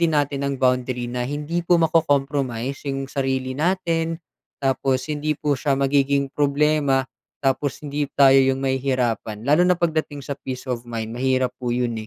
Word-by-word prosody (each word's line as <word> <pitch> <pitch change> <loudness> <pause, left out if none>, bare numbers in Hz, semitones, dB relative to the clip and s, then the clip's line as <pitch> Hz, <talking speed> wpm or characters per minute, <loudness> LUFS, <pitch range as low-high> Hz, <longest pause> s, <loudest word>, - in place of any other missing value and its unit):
din 165 -2 +2
natin 140 -1 -1
ng 140 -1 -1
boundary 125 -1 +1
na 125 0 -2
hindi 150 +4 -2
po 175 +1 +4
mako-compromise 140 -5 0
'yong 135 0 -3
sarili 130 -1 -1
natin. 165 0 0 0.4
Tapos 130 0 0
hindi 150 +1 -1
po 145 0 +1
siya 140 0 +1
magiging 140 0 +2
problema, 145 -1 +2 0.4
tapos 135 +1 0
hindi 145 0 -2
tayo 135 -1 +6
'yong 130 0 +1
mahihirapan. 125 -5 -1
Lalo 150 +5 +5
na 180 -1 +3
pagdating 160 -4 -1
sa 140 - -3
peace 130 -1 -6
of 125 -2 -3
mind. 115 -1 -4
Mahirap 130 0 +1
po 125 -1 -2
'yon 120 -1 0
135 Hz, 160 wpm, -22 LUFS, 130-150 Hz, 0.4 s, tayo